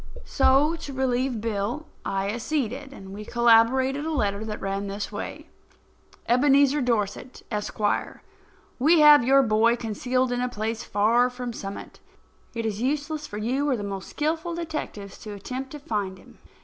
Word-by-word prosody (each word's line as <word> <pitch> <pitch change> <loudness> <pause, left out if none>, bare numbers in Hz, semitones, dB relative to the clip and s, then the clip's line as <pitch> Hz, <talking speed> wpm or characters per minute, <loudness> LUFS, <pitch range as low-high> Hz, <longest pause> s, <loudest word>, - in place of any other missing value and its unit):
So, 275 +4 +3
to 285 -3 -8
relieve 255 -2 0
Bill, 225 +7 -2 0.2
I 195 0 -1
acceded, 260 +2 -3
and 195 -7 -10
we 210 +1 -7
collaborated 240 +5 +3
a 320 - -2
letter 205 -8 0
that 215 -1 -5
ran 195 +1 -3
this 200 +1 -4
way: - - -6 0.8
Ebenezer 280 +3 +4
Dorset, 235 0 -2
Esq.: 210 0 -4 1.0
We 310 +5 +5
have 295 -3 +8
your 270 +2 +5
boy 225 +1 +3
concealed 245 +3 -1
in 245 0 -1
a 250 - 0
place 225 0 -3
far 230 +5 +3
from 245 -1 -6
Summit. 195 -2 -8 0.6
It 230 -1 -2
is 215 -1 -2
useless 295 +3 -2
for 205 - -7
you 260 +7 0
or 260 - +1
the 205 - -5
most 195 -1 -5
skilful 320 +3 -2
detectives 305 - -6
to 210 - -8
attempt 255 +7 -6
to 295 - -7
find 205 -8 -3
him. - - -18
245 Hz, 160 wpm, -25 LUFS, 210-275 Hz, 1.0 s, have